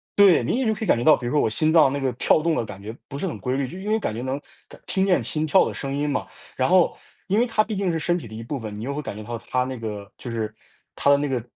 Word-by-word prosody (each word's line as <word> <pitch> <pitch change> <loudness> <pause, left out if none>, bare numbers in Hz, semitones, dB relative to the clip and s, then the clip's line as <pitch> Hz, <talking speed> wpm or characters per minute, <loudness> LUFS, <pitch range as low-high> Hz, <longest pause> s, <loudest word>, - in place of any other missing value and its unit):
对， 200 -4 +6
明 - - 0
显 265 - 0
就 220 - +3
可 220 +1 -4
以 - - -6
感 - - +4
觉 120 - -2
到， 155 - +7
比 125 - -7
如 120 - -1
说 150 - +3
我 - - +2
心 155 +8 +2
脏 155 -5 +6
那 140 - -2
个 135 -1 0
跳 140 - +3
动 165 0 +1
的 - - 0
感 100 -2 -9
觉 110 +3 -7
不 140 - -6
是 190 - -2
很 165 - -4
规 130 +1 -1
律。 135 -2 -1
就 180 - -8
因 205 +2 -5
为 220 +1 +2
感 150 - -2
觉 115 - -4
能 130 +2 -2 0.3
感 - - -14
听 190 0 +1
见 185 -2 +2
心 155 0 -1
跳 190 +5 +5
的 - - -4
声 135 -1 -4
音 145 +1 0
嘛， 140 - -1 0.3
然 130 - +1
后 180 -1 +4 0.3
因 200 +3 +2
为 240 - +4
它 225 -2 +2
毕 215 0 -4
竟 195 -2 0
是 165 - -1
身 175 +3 +1
体 155 - -8
的 110 - -10
一 115 - -6
部 135 +4 -4
分， 110 -3 -6
你 105 - -7
又 140 +3 -3
会 150 - -3
感 130 - -6
觉 110 - -7
到 120 +2 -5
它 125 0 +2
那 130 0 -5
个 105 -3 -6
就 125 - -7
是 110 -2 -3 0.4
它 - - +1
的 140 - +6
那 145 - -1
个 130 -3 -1
140 Hz, 370 characters per minute, -24 LUFS, 120-180 Hz, 0.4 s, 到